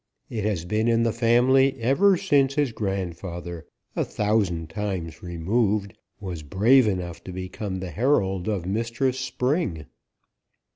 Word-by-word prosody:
It 110 -3 -2
has 95 -6 -1
been 110 +5 0
in 115 0 +3
the 115 -1 +1
family 125 +3 +3
ever 175 - +4
since 140 -7 +2
his 145 -4 +1
grandfather 90 -5 -4 0.3
a - - +1
thousand 100 -7 0
times 90 -4 -4
removed 100 +3 0 0.3
was 90 -5 -5
brave 110 - +4
enough 90 -4 -3
to 95 - -6
become 95 +1 -5
the 90 -2 -5
herald 95 - +1
of 100 -5 -1
Mistress 115 +6 -1
Spring." 125 - -1
105 Hz, 135 wpm, -25 LUFS, 90-120 Hz, 0.3 s, ever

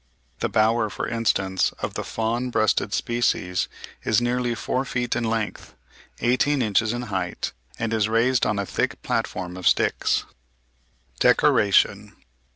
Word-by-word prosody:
The - - -1
bower, 110 0 +2
for - - -4
instance, 95 -5 0
of - - -4
the - - -3
Fawn 115 +3 -2
breasted 110 -3 +1
species, 115 -6 0 0.4
is 110 - +3
nearly 120 0 0
four 130 +3 -1
feet 120 -3 -2
in 120 - -1
length, 110 -1 -3 0.5
eighteen 130 +3 +2
inches 110 0 +2
in 120 +1 -3
height, 90 -2 -2 0.3
and 115 -1 -2
is 110 -1 +1
raised 120 +3 +2
on 105 -1 0
a 100 - -1
thick - - -2
platform 90 -1 -2
of 90 - -2
sticks. - - +2 1.0
DECORATION. 100 0 +3
115 Hz, 140 wpm, -24 LUFS, 100-120 Hz, 1.0 s, is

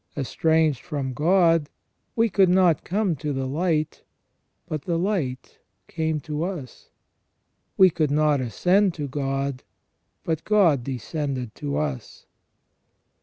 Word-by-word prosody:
Estranged 155 +1 +1
from 140 -6 -4
God, 165 0 +3 0.5
we 230 0 +3
could 195 -2 +3
not 180 -4 +3
come 195 -2 0
to 150 +1 -3
the 135 -1 -2
light; 155 +2 -1 0.6
but 155 -3 -5
the 170 -2 0
light 170 -9 -3 0.3
came 160 -1 -2
to 150 0 -4
us. 170 -9 -7 0.9
We 190 -1 +7
could 155 -2 0
not 150 -1 +2
ascend 180 - +2
to 145 -3 -4
God; 135 -1 -2 0.6
but 160 -1 -2
God 175 - +3
descended 130 -1 -4
to 145 -1 -4
us. 145 -6 -4
155 Hz, 125 wpm, -24 LUFS, 140-175 Hz, 0.9 s, We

